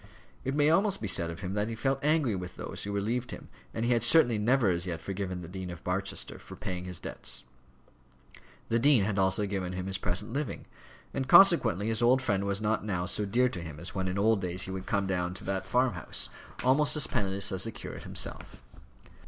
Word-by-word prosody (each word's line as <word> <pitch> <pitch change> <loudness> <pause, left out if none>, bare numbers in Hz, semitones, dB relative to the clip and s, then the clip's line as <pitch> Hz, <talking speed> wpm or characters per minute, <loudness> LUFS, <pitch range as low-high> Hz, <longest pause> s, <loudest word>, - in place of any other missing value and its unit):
It 135 +1 -2
may 150 +1 +4
almost 195 +3 +2
be 105 - -4
said 85 -2 +3
of 85 +3 -7
him 95 0 -4
that 105 +1 0
he 115 - -4
felt 135 +4 -1
angry 150 -7 +2
with 90 -1 -6
those - - -5
who 100 - -3
relieved 115 +5 -2
him, - - -9 0.2
and 115 - -3
he 120 - +1
had 120 - +1
certainly 120 -4 +5
never 115 -1 +3
as 85 +1 -2
yet 85 -2 -3
forgiven 95 -1 -4
the - - -8
Dean 95 +1 -6
of 85 0 -9
Barchester 95 +2 -2
for - - -11
paying 90 -1 -5
his 90 -2 -4
debts. - - -4 1.3
The 115 - +2
dean 130 -4 +5
had 100 0 -1
also 95 +2 +2
given 95 -2 -3
him 90 0 -4
his 95 0 -2
present 100 +5 -3
living; 145 0 -3 0.5
and 130 - -2
consequently 130 - +6
his 115 +1 -1
old 125 +2 +5
friend 100 -6 0
was 100 0 0
not 110 0 0
now 90 -4 -2
so 100 +2 0
dear 125 +5 +3
to 90 - -6
him 80 -3 -8
as 85 - -5
when 95 -1 -2
in 90 +1 -2
old 105 0 +3
days 90 -1 -3
he 95 - -5
would 95 0 -6
come 100 -1 0
down 90 -1 -2
to - - -7
that 95 0 -3
farm 125 -1 +2
house, 85 -3 -1 0.3
almost 140 +5 +3
as 150 - +1
penniless 100 0 +1
as 95 +1 +4
the 115 - -2
curate - - -8
himself. - - -5
100 Hz, 225 wpm, -29 LUFS, 95-120 Hz, 1.3 s, consequently